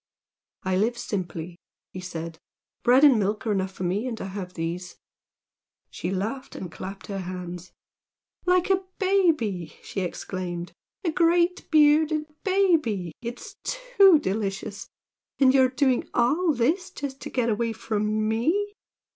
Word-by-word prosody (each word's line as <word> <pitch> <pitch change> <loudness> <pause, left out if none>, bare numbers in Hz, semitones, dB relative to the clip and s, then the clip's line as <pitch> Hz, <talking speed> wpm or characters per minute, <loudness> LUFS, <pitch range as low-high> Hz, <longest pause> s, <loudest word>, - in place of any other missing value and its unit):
"I 185 -1 +1
live 230 +5 +1
simply," 175 -5 -4 0.3
he 185 - -6
said 165 -3 -6 0.4
"Bread 250 +3 +5
and 270 -6 +7
milk 210 +4 -1
are 220 - +1
enough 190 -2 0
for 185 - -6
me, 195 +7 0
and 230 -3 -4
I 195 - -5
have 185 -2 -6
these." 175 +2 -4 0.9
She - - -4
laughed 215 +8 -3
and 180 -3 -6
clapped 195 +4 -7
her 195 -1 -4
hands. 180 -1 -6 0.8
"Like 360 +1 +3
a 380 0 +3 0.2
baby!" 310 - +1
she 195 - -4
exclaimed 175 -1 -4 0.3
"A 335 - +2
big 345 +2 +2
bearded 305 0 +4 0.2
baby! 320 - +2
It's 240 0 -7
too - - +5
delicious! 200 -4 -3 0.5
And 265 -2 +5
you're 260 -1 +5
doing 255 -1 +1
all 310 +9 +3
this 300 +8 +1
just 275 -1 -6
to - - -6
get 240 -2 0
away 230 +1 0
from 215 -1 -1
ME! 330 - +1
225 Hz, 140 wpm, -26 LUFS, 185-305 Hz, 0.9 s, and